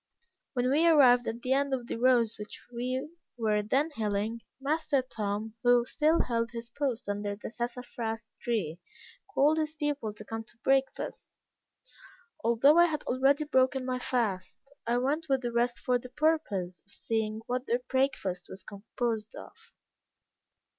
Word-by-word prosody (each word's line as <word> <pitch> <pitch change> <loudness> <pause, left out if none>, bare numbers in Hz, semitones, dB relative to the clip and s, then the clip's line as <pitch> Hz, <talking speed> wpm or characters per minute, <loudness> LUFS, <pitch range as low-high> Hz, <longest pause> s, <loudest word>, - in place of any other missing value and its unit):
When 250 -1 +1
we 315 +4 +4
arrived 255 -7 +6
at 230 +1 -4
the 255 - +2
end 275 0 +2
of 245 -2 -6
the - - -4
rows 235 -2 +3
which 210 - -8
we 255 +4 -2 0.3
were 215 -2 +1
then 270 +10 +1
hilling, 215 -1 -1 0.2
master 290 -1 +1
Tom, 215 -2 -3
who 245 -1 +5
still 315 +5 +2
held 230 -1 -1
his 235 0 -7
post 250 -3 -2
under 205 0 -2
the 210 - -8
sassafras 235 -2 -4
tree, 195 -9 -2 0.5
called 305 -2 +3
his 310 0 -2
people 290 -7 -2
to 210 - -11
come 225 0 -5
to 225 - -20
breakfast. 270 0 0 1.1
Although 255 +8 +5
I 345 - +8
had 305 -2 -3
already 270 +4 +2
broken 260 -2 +2
my 255 0 -1
fast, 210 -8 -1 0.3
I 240 +1 +2
went 290 +6 0
with 270 -1 +2
the 240 - -1
rest 240 +1 +1
for 250 -1 +1
the 250 - -10
purpose 250 - 0
of - - -20
seeing 220 -1 -1
what 250 +1 -2
their 240 +1 +1
breakfast 230 -9 0
was 190 0 -9
composed 220 +2 -4
of. - - -10
245 Hz, 160 wpm, -30 LUFS, 220-270 Hz, 1.1 s, I